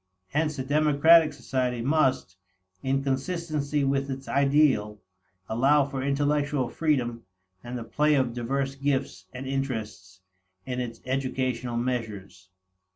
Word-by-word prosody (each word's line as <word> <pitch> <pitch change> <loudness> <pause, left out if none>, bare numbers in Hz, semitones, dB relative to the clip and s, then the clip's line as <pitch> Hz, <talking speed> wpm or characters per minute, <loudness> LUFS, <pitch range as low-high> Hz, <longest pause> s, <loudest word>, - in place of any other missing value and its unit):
Hence 155 0 -1
a 130 - -3
democratic 155 +3 +5
society 125 -3 -2
must, 130 -9 +1 0.5
in 135 +1 0
consistency 150 +1 -1
with 135 0 0
its 135 0 -6
ideal, 135 -7 +2 0.5
allow 135 +5 +3
for 135 -1 -4
intellectual 145 -1 0
freedom 125 -8 0 0.4
and 120 +1 -5
the 120 - -5
play 150 +6 +2
of 130 -4 +1
diverse 135 +3 -2
gifts 135 -9 -2
and 125 +5 -7
interests 110 -9 -4 0.4
in 125 -1 -3
its 120 -2 -5
educational 130 -2 -2
measures. 105 -6 -4
135 Hz, 120 wpm, -26 LUFS, 120-145 Hz, 0.5 s, democratic